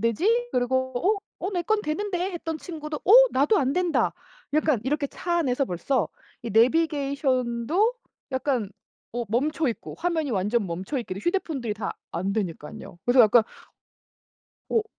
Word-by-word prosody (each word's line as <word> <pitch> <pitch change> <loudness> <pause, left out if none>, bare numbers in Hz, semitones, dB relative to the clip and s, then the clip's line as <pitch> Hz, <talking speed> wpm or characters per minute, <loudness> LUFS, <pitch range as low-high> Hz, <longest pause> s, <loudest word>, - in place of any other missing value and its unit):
되지?" 425 - +1
그리고 260 +1 0
"어? 400 - +2 0.3
어 - - -2
내 350 -2 0
건 435 +3 +1
되는데." 370 +3 -2
했던 325 -2 -4
친구도 305 -3 -6
"어. 400 - +5 0.2
나도 285 +11 +3
안 270 -1 +1
된다." 355 0 +1 0.4
약간 305 -7 +2
이렇게 285 +1 0
차 345 +4 -2
안에서 275 -4 +1
벌써 240 +7 -1 0.3
이 235 - -4
내비게이션도 275 - +2 0.4
약간 255 -6 -1 0.4
어 240 0 -2
멈춰있고 275 +2 -1
화면이 325 -5 -1
완전 205 +2 0
멈춰있게도 190 - -4
휴대폰들이 290 - -1
다 210 - -4 0.2
안 190 +3 -2
되니깐요. 175 -4 -5
그래서 245 +1 +5
약간 225 +1 +7 1.3
오. 445 -1 +1
275 Hz, 300 characters per minute, -25 LUFS, 235-330 Hz, 1.3 s, 약간